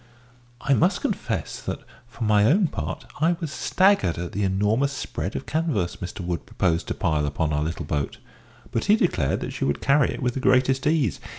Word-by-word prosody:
I 140 - +2
must 120 - +2
confess - - -2
that, - - -4 0.3
for 120 +1 -7
my 105 -1 +4
own 175 - +4
part, 155 - -5
I 165 +3 +3
was 165 -5 -4
staggered 190 - +2
at 85 0 -4
the 105 - -3
enormous 105 +8 +1
spread 130 - -4
of - - -4
canvas 150 - -1
Mr 90 +2 -6
Wood 85 -1 -3
proposed 85 -2 0
to - - -2
pile 75 -2 0
upon 75 +1 -1
our 75 - +1
little 80 +2 -3
boat; 75 -2 -2 0.5
but 115 - -1
he 210 - +6
declared 90 - +1
that - - -4
she - - -3
would 70 - 0
carry 140 +1 +3
it - - -4
with 125 -1 +1
the 135 - -3
greatest 130 +1 +3
ease. 150 - +1
115 Hz, 200 wpm, -24 LUFS, -, 0.5 s, he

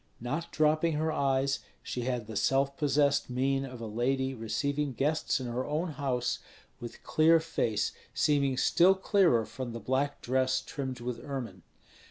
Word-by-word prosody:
Not 150 +8 -4
dropping 155 +1 +2
her 155 +1 0
eyes, 135 -1 +1 0.2
she 120 -1 -4
had 125 -3 -2
the 110 0 -8
self 135 +6 +2
possessed 145 -1 +2
mien 135 +2 0
of 125 -2 -9
a 115 - -5
lady 130 +4 0
receiving 140 +5 -2
guests 150 +5 0
in 130 - -5
her 120 +1 -2
own 155 +5 -2
house, 130 -5 -1 0.4
with 120 -1 -9
clear 165 +1 +4
face 140 -9 -1 0.2
seeming 140 -3 +2
still 180 +8 +5
clearer 190 - +3
from 125 -1 -6
the 115 - -5
black 135 +5 -1
dress 130 +1 +1
trimmed 130 -3 -5
with 125 0 -4
ermine. 125 -10 -5
135 Hz, 160 wpm, -30 LUFS, 125-150 Hz, 0.4 s, still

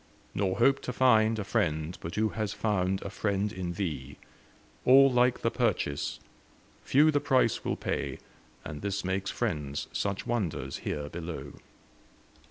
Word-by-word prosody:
Nor 95 -2 0
hope 135 +3 +4
to - - -4
find 115 -3 +4
A 105 - -2
friend, 90 -6 -1
but 85 - -6
who 110 0 +2
has 105 -2 -3
found 95 -3 0
a 100 - -5
friend 100 0 -1
in 90 -3 -4
thee. 75 -8 -4 0.7
All 135 +1 +7
like 125 0 +3
the - - +2
purchase; 70 -1 -1 0.6
few 150 +4 +4
the 145 - +2
price 130 -5 +2
will - - -1
pay 70 -2 -3 0.5
And 75 0 -6
this 100 -1 -2
makes 95 0 -1
friends 70 -1 -2
such 100 -1 -2
wonders 110 -9 -2
here 75 -1 -4
below. 80 -4 -6
100 Hz, 150 wpm, -29 LUFS, 85-115 Hz, 0.7 s, All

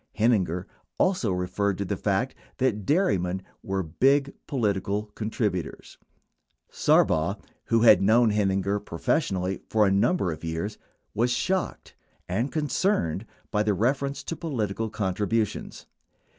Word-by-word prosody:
Heininger 95 -6 +2 0.3
also 180 - +2
referred 90 +2 -1
to 100 - -2
the 100 - -2
fact 100 +6 0 0.2
that 105 -7 0
dairy 150 - +3
men 90 +2 -3 0.2
were 95 -1 -2
big 135 - +2
political 105 - 0
contributors. 105 -5 -3 0.7
Sarbaugh, 80 +5 +3 0.3
who 115 -1 +2
had 105 -5 +7
known 110 +3 +4
Heininger 100 0 0
professionally 95 - -1
for 110 -1 +4
a 95 - +3
number 100 - +2
of 80 - -7
years, 85 +6 -3 0.3
was 120 +3 +1
shocked 185 +9 -1 0.3
and 115 +10 -1
concerned 145 - 0 0.2
by 105 - +2
the 105 -1 +1
reference 135 +7 0
to 165 - -4
political 115 - -2
con 100 -3 -2
tributions. 105 +2 -2
105 Hz, 130 wpm, -26 LUFS, 95-120 Hz, 0.7 s, had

